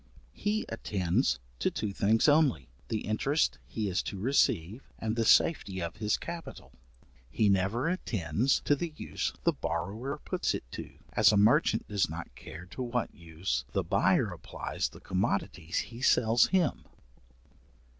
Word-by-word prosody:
He 210 +2 -1
attends 90 - 0 0.2
to - - +2
two 105 -2 -3
things 110 +6 +3
only, 145 - +3 0.2
the 110 -2 -2
interest 110 - 0
he 105 +9 -3
is 95 -1 0
to 100 - -6
receive, 105 - +1 0.2
and 110 0 -2
the 115 - +1
safety 100 - +3
of 85 +3 -4
his 105 -1 +1
capital. 170 -1 -8 0.6
He 105 - +2
never 100 - +1
attends 125 - 0
to 145 - +2
the 160 +1 -5
use - - -3
the 170 - +3
borrower 100 - -3
puts - - -1
it - - -5
to, - - -8 0.2
as - - +6
a 105 - +3
merchant 115 +10 +4
does 100 -6 +1
not 80 -4 -7
care 80 +7 -10
to - - -6
what 125 -1 -2
use 85 +1 -3
the - - +1
buyer - - +2
applies - - -4
the - - -14
commodities 90 -4 -1
he 120 +1 -4
sells 115 -3 +4
him. 185 -5 +1
110 Hz, 155 wpm, -30 LUFS, 90-135 Hz, 0.6 s, as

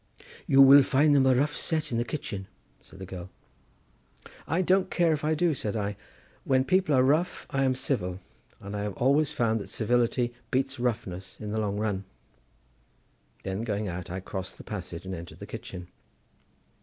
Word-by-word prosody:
"You 135 -4 +7
will 140 +1 +9
find 145 +2 +3
them 135 -1 +5
a 130 - +5
rough 145 +4 +1
set 160 -5 -1
in 115 - 0
the - - +1
kitchen," 110 -7 -5 0.3
said - - -16
the 95 - -7
girl. 90 -1 -8 1.2
"I 165 +5 +1
don't 185 +1 +3
care 170 -4 +2
if 150 - -3
I 155 +1 +2
do," 170 +1 +2
said 110 -6 -3
I; 105 -1 -2 0.5
"when 130 -1 +2
people 185 -4 +3
are 130 - +5
rough 155 +7 +1
I 135 0 +1
am 130 -1 +2
civil, 95 -9 -1 0.4
and 100 +1 -7
I 105 - -2
have 105 -2 -3
always 140 +4 +3
found 115 -6 +1
that 100 - -8
civility 120 +1 +1 0.2
beats 135 +1 -1
roughness 100 -7 -3
in 105 -1 -5
the 110 - -1
long 105 -1 -1
run." 105 -2 -2 1.4
Then 95 +2 -3
going 105 -2 -2
out 90 0 -6
I 95 +2 -4
crossed 95 0 -6
the - - -11
passage 90 -4 -6
and 95 - -5
entered 85 -1 -8
the - - -8
kitchen. 90 -1 -8
120 Hz, 185 wpm, -28 LUFS, 100-140 Hz, 1.4 s, will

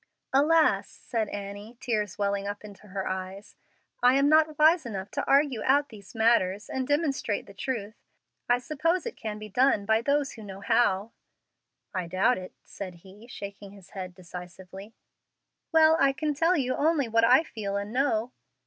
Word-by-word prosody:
"Alas!" 315 +4 +3
said 225 -3 -4
Annie, 205 +3 -7
tears 210 -5 -2
welling 200 -1 -1
up 205 +1 -6
into 210 0 -13
her 195 0 -4
eyes, 190 +2 -6 0.5
"I 250 +1 +5
am 275 +1 +4
not 310 -1 +4
wise 315 +2 +5
enough 200 -5 -6
to 280 - -2
argue 275 -5 +3
out 285 +2 +2
these 205 -1 -14
matters 220 -3 +2
and 260 -1 -3
demonstrate 290 -8 0
the 200 - -13
truth. 215 -1 -4 0.6
I 245 - +5
suppose 330 - -1
it 475 - -5
can 215 -1 -5
be 215 0 -8
done 215 -1 +2
by 220 +1 +3
those 280 +2 +1
who 225 - -11
know 195 -1 -9
how." 205 -1 +2 0.8
"I 185 -3 -2
doubt 190 +7 +2
it," 185 - -9
said 185 -3 -8
he, 205 +5 -14
shaking 200 -3 -9
his 195 -3 -16
head 185 -2 -7
decisively. 185 +3 -10 0.8
"Well, 320 -1 +6
I 275 0 +4
can 300 +2 -1
tell 330 +5 +2
you 255 -3 0
only 300 -3 +1
what 225 0 +2
I 255 +6 +6
feel 205 -9 -4
and 200 +2 -5
know." 250 -3 +1
220 Hz, 175 wpm, -27 LUFS, 200-275 Hz, 0.8 s, Well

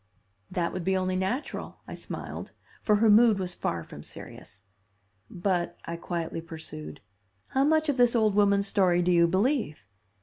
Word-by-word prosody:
"That 170 -1 -1
would 185 - -4
be 190 +2 +1
only 185 0 -1
natural," 190 +10 -3
I - - -7
smiled, - - -7 0.3
for 210 - +3
her 220 +2 +3
mood 220 0 +6
was 185 -2 -3
far 85 - -3
from - - -11
serious. 100 - -11 0.7
"But," 175 -1 -1
I 170 - -4
quietly 170 -1 -4
pursued, 155 -3 -9 0.5
"how 270 +1 +2
much 315 +1 +3
of 285 -3 0
this 245 -1 +4
old 215 -3 +3
woman's 200 -1 +3
story 180 -3 +2
do 180 - +2
you 170 -1 +5
believe? 200 - 0
190 Hz, 165 wpm, -27 LUFS, 170-220 Hz, 0.7 s, mood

